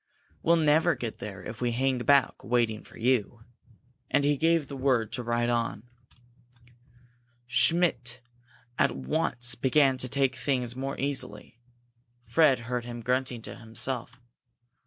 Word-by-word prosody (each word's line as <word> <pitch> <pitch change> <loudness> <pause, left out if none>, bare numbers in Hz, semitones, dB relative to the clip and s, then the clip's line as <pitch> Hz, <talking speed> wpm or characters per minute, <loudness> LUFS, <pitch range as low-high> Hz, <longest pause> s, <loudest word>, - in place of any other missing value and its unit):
"We'll 170 - +4
never 160 +1 +3
get 120 -3 -6
there 100 -3 -7
if 110 +5 -8
we 120 -1 0
hang 130 +1 0
back 140 +1 +3
waiting 115 -1 0
for - - -16
you." 120 -1 0 0.7
And 145 +1 +2
he 145 +1 +3
gave 165 +1 +2
the 140 - -8
word 130 -5 +1
to 125 - -2
ride 120 0 0
on. 115 -2 -1 1.6
Schmidt 125 -1 +2 0.6
at - - +3
once 120 - -1
began 135 +2 +3
to 130 - -1
take 135 -2 +1
things 125 -3 -1
more 135 +1 -4
easily. 125 -5 -4 0.7
Fred 145 -7 +3
heard 120 0 -3
him 120 0 -7
grunting 125 -1 -1
to - - -7
himself. 120 +2 -4
125 Hz, 135 wpm, -28 LUFS, 120-140 Hz, 1.6 s, We'll